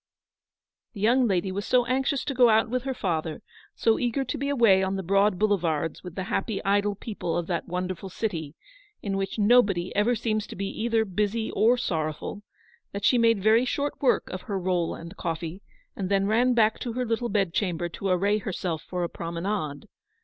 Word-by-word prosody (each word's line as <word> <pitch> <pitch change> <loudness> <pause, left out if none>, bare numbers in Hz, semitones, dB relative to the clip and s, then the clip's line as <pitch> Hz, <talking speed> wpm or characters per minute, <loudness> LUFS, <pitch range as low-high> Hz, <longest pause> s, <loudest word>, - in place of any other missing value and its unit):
The 210 - -9
young 245 +3 +4
lady 190 -2 0
was 200 +2 -3
so 250 +2 +3
anxious 265 +2 0
to 280 - -2
go 245 -2 +5
out 220 +1 +3
with 255 0 -1
her 265 - -1
father, 160 -6 -2 0.3
so 225 -1 +2
eager 250 +3 0
to 250 - -4
be 280 +1 -1
away 230 -9 +5
on 190 0 0
the 190 - -3
broad 195 +1 +3
boulevards 170 -7 0
with 180 -2 -9
the 185 - -3
happy 195 +2 -2
idle 205 +1 +2
people 180 -6 -4
of 175 - -1
that 170 0 -3
wonderful 180 +1 -4
city 165 -7 -4 0.5
in 195 -2 -2
which 195 +2 -2
nobody 205 -5 +3
ever 215 +4 +3
seems 215 -1 -1
to - - -9
be 195 - -3 0.2
either 225 -1 +2
busy 210 +3 -1
or 225 +5 +3
sorrowful, 160 -1 -3 0.5
that 200 0 -3
she 250 - +4
made 230 -4 +3
very 220 +3 +5
short 285 +3 -2
work 265 - +2
of 185 - -5
her 200 - 0
roll 180 -2 0
and 170 +3 -10
coffee, 165 +3 -4 0.3
and 190 -2 -3
then 195 -1 +2
ran 240 +4 +3
back 220 -1 +3
to 240 - -4
her 250 +1 -1
little 235 +1 -1
bed 195 -4 0
chamber 175 -4 -1
to 185 +3 -5
array 200 +4 +2
herself 180 -5 -3
for 180 +1 -4
a - - 0
promenade. 170 -3 -4
200 Hz, 200 wpm, -26 LUFS, 180-230 Hz, 0.5 s, go